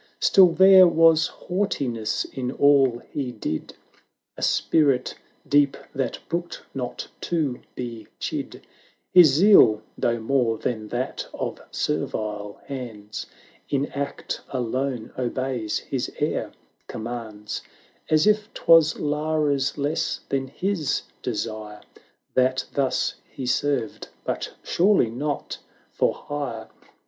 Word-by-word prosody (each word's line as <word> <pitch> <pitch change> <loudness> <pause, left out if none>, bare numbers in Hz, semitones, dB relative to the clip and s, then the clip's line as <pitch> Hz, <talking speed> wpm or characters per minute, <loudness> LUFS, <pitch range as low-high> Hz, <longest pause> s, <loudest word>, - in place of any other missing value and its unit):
Still 190 -2 +7
there 190 +1 +8
was 165 -1 +5
haughtiness 135 - -2
in 125 -1 -3
all 135 -4 +4
he 135 -4 -3
did, 105 -9 -5 0.6
A - - -10
spirit 140 -5 +2 0.3
deep 145 -1 +3 0.2
that 135 -1 -2
brooked 170 0 -4
not 125 -3 -5 0.2
to 150 -7 0
be 120 -3 -6
chid; - - -5 0.5
His 180 -3 +9
zeal, 140 - +6
though 120 -1 0
more 115 -1 +1
than 110 -1 -3
that 120 +3 -3
of - - -4
ser\ale 105 -1 -3
hands, 110 -6 -7 0.4
560 - - 0
In 140 +1 +1
act 140 0 -4
alone 125 -1 -2
obeys, 125 -3 -2
his - - -3
air - - -1 0.4
commands; 110 -2 -6 0.5
As 155 0 +4
if 210 0 +2
'twas 165 -2 +5
Lara's 150 -2 0
less 145 +1 -1
than 135 -1 -1
his 175 +2 -1 0.2
desire 110 -3 -4 0.5
That 130 0 +2
thus 135 -2 0 0.2
he 130 - -6
served, 140 -3 -1 0.2
but - - -4
surely 180 - +3
not 145 +4 -3 0.3
for - - +1
hire. 135 -7 -5
135 Hz, 115 wpm, -24 LUFS, 115-155 Hz, 0.6 s, His